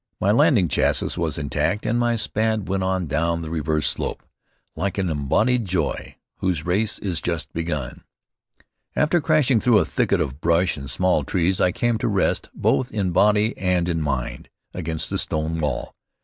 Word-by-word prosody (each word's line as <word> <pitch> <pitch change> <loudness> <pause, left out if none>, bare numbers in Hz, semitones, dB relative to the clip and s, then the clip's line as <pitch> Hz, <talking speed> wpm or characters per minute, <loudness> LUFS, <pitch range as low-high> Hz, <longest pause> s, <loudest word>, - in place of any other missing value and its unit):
My 100 - +2
landing 120 - +4
chassis - - +1
was 80 -3 -1
intact 75 +7 -1
and 115 +2 +1
my 120 -1 +2
Spad 110 -1 -1
went 95 0 -1
on 95 -1 0
down 85 +3 -1
the 80 - -6
reverse 75 -2 0
slope - - -2 0.5
"Like 100 +1 -2
an 95 -3 0
embodied 110 - +1
joy, 90 -2 -2 0.2
whose 90 -5 -1
race 100 +5 +1
is 90 -5 -2
just 80 -5 -3
begun." 75 -6 -4 0.9
After 155 +3 +2
crashing 145 -6 +3
through 120 -1 +4
a 90 - +3
thicket - - +1
of 65 +3 -3
brush 85 +2 +2
and 70 -1 -7
small 90 +6 +1
trees, 90 +1 0
I 90 - +4
came 120 +3 0
to - - -1
rest, 100 -3 0
both 130 -1 +1
in 100 -4 -1
body 105 +5 +3
and 90 -2 +1
in 85 -2 -1
mind, 65 -5 -3 0.2
against 80 -3 -4
a - - 0
stone 80 +1 -2
wall. 75 -5 -2
90 Hz, 175 wpm, -23 LUFS, 80-105 Hz, 0.9 s, landing